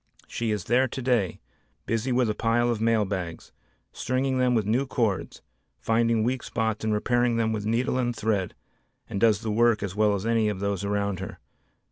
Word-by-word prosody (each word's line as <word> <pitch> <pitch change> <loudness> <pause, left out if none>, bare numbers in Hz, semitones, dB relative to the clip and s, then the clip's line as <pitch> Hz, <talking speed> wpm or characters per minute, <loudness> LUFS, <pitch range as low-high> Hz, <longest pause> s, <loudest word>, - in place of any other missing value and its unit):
She 115 -1 -3
is 105 -4 -1
there 125 +3 +2
today 120 -7 -1 0.5
busy 115 +3 -1
with 125 -1 +2
a 105 - 0
pile 120 +2 +1
of 110 -2 -2
mail 115 -2 +2
bags, 90 -4 -5 0.4
stringing 130 +1 -1
them 125 -1 +3
with 110 -3 +1
new 125 +6 +1
cords, 110 -7 -2 0.3
finding 115 0 +1
weak 125 +2 0
spots 110 -2 -2
and 110 - 0
repairing 120 +2 +1
them 110 -1 +1
with 105 -1 -3
needle 120 +3 0
and 120 -1 -1
thread 105 -4 -1 0.5
and 100 - -4
does 110 -2 +4
the 110 - -2
work 115 0 +3
as 95 -2 -4
well 105 -1 +3
as 100 +1 -4
any 115 -2 +2
of 100 -3 -4
those 100 -1 -2
around 100 -2 -1
her. 95 - -7
110 Hz, 190 wpm, -26 LUFS, 105-120 Hz, 0.5 s, does